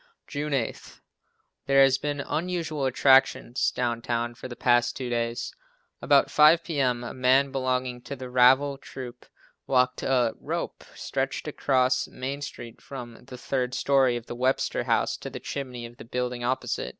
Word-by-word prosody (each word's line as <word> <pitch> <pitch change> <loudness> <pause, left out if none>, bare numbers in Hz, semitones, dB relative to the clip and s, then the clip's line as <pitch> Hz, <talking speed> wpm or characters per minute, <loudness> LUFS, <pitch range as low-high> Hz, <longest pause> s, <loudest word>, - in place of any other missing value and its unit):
June 150 +1 -4
8. 135 -5 -3 0.7
There 135 0 +6
have 135 0 +3
been 145 -1 -2
unusual 160 -3 -2
attractions 130 -1 +3
down 120 -2 -2
town 120 0 -2
for 120 - -9
the 120 - -8
past 120 -1 +2
two 125 -2 -4
days. 115 0 -2 0.5
About - - +4
5 155 +3 +6
p.m. 130 -7 0
a 120 - -6
man 130 +2 +3
belonging 130 -2 -1
to 140 - -5
the 130 -1 -8
Ravel 130 +3 +4
troupe 125 -3 -10 0.4
walked 125 -1 +2
a 125 -4 +1
rope, - - -4
stretched - - -3
across 130 -2 +1
Main 135 +3 -5
street 120 -4 -8
from 125 -4 -9
the 125 - -10
third 125 0 -2
story 135 -2 +3
of 115 - -9
the - - -7
Webster 130 +2 0
House - - +1
to - - -7
the - - -7
chimney 125 -4 -6
of 120 +1 -12
the - - -11
building 125 0 -3
opposite. 130 +2 -2
130 Hz, 160 wpm, -26 LUFS, 120-135 Hz, 0.7 s, There